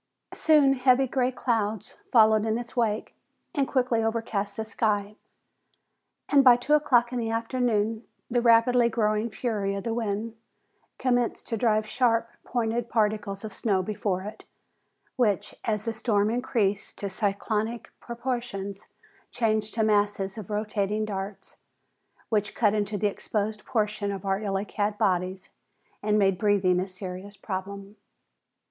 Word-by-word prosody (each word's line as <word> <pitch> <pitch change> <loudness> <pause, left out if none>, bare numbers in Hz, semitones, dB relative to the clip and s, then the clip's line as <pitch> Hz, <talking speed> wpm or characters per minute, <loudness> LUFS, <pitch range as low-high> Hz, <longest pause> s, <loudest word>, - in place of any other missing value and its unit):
Soon 295 -4 +4
heavy, 255 0 +4
gray 255 0 0
clouds 220 -5 -1
followed 220 -2 +5
in 220 0 0
its 240 +1 -7
wake, 220 -3 0 0.4
and 275 -3 +1
quickly 250 -3 +1
overcast 220 -3 -2
the 220 - -2
sky, 210 -2 -1 1.1
and 280 -2 +5
by 250 -2 +8
two 245 +5 -1
o'clock 255 -5 +3
in 250 - -1
the 225 -1 -2
afternoon 225 -1 0 0.2
the 240 0 +1
rapidly 235 +1 +5
growing 215 0 0
fury 210 -4 -2
of 195 - -4
the 230 - -2
wind 225 0 -2 0.6
commenced 245 -2 0
to 230 - 0
drive 215 -1 +2
sharp 230 -2 +1
pointed 235 0 -1
particles 210 -2 0
of 210 - -7
snow 195 -3 0
before 195 -2 -2
it, 210 +2 -8 0.7
which, 210 -4 +1
as 215 -2 -1
the 230 - -1
storm 215 -2 +1
increased 225 -5 -1
to 200 - -3
cyclonic 210 +3 -2
proportions, 235 -5 -4 0.4
changed 215 -2 0
to 225 - +2
masses 205 -2 +1
of 215 -3 -8
rotating 210 0 -1
darts, 195 -1 -6 0.7
which 215 -1 0
cut 210 -3 +3
into 210 0 -1
the 205 - -1
exposed 210 +1 -2
portions 210 -3 -1
of 195 -1 -7
our 195 +1 0
illy 195 -1 -1
clad 205 0 -2
bodies 185 -2 -1 0.5
and 210 0 +2
made 195 -3 +2
breathing 195 -4 +3
a 185 - -2
serious 185 +1 -8
problem. 200 +2 -6
215 Hz, 140 wpm, -27 LUFS, 200-235 Hz, 1.1 s, by